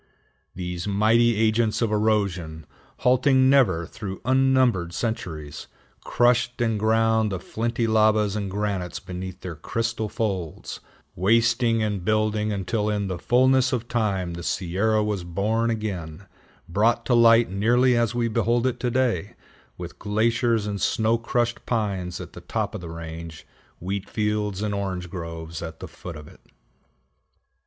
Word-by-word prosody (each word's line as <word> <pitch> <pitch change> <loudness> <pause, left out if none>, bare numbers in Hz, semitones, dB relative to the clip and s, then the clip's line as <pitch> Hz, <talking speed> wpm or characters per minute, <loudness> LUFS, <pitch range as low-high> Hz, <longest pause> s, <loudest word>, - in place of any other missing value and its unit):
These 90 0 -4
mighty 110 +3 +3
agents 110 0 +2
of 115 -3 0
erosion, 100 -7 0 0.4
halting 130 +1 +4
never 95 -12 +3
through 95 +1 -7
unnumbered 130 -9 +2
centuries, 85 -10 -4 0.4
crushed 120 0 +2
and 115 -3 +1
ground 110 0 +2
the 95 - -2
flinty 115 +4 -2
lavas 110 -2 +3
and 100 -2 -2
granites 95 -4 -3
beneath 90 0 -7
their 90 - -5
crystal 115 +7 -3
folds, 100 - -4 0.4
wasting 115 +3 +2
and 105 -4 -2
building 110 +1 +1
until 105 +2 -1
in 100 -2 -1
the 90 -2 -4
fullness 130 +1 +3
of 120 -2 -2
time 100 -7 -1
the 85 - -6
Sierra 100 +5 0
was 105 -4 -2
born 105 +7 0
again, 100 -6 -4 0.4
brought 115 +6 +1
to 125 - +1
light 115 -2 +5
nearly 120 +6 +3
as 120 0 +1
we 120 -1 +1
behold 115 +2 +1
it 130 - -1
today, 120 -7 0 0.4
with - - -8
glaciers 115 +1 +1
and 100 -1 -3
snow 110 +1 +2
crushed 120 0 -1
pines 100 -6 -2
at - - -9
the - - -10
top - - -3
of - - -6
the 85 - -7
range, 80 0 -8 0.3
wheat 95 +2 -4
fields 105 -2 -1
and 105 -1 -1
orange 95 -3 -3
groves 85 -2 -6
at 80 -1 -7
the - - -7
foot 90 -2 -9
of 75 -1 -10
it. - - -16
105 Hz, 145 wpm, -24 LUFS, 95-115 Hz, 0.4 s, light